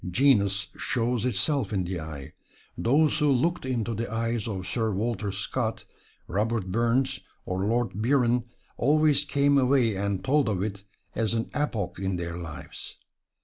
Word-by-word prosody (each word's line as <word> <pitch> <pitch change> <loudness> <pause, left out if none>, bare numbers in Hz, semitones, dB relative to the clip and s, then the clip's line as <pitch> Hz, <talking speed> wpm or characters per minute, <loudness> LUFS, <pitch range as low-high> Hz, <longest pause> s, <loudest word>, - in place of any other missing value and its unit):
Genius 100 -4 +3
shows 120 -1 0
itself 125 +1 0
in 95 -3 0
the 90 0 -3
eye. 75 -4 -8 0.4
Those 150 +6 +3
who 150 -2 +3
looked 160 +3 +1
into 120 -3 -1
the 115 +1 -3
eyes 115 -1 -1
of 95 -4 -4
Sir 110 +5 0
Walter 105 0 -1
Scott, 110 +4 -2 0.4
Robert 105 0 -1
Burns 120 +5 +1 0.3
or 95 +1 -2
Lord 115 -2 +1
Byron, 120 -1 +2 0.3
always 150 +1 +4
came 140 0 +3
away 125 -4 +3
and 100 -1 -1
told 135 -2 +3
of 95 -3 0
it 100 -1 -4 0.3
as 115 0 0
an 115 - -2
epoch 110 -11 -2
in 95 -1 -1
their 85 -1 -4
lives. 85 -3 -7
115 Hz, 150 wpm, -27 LUFS, 100-130 Hz, 0.4 s, always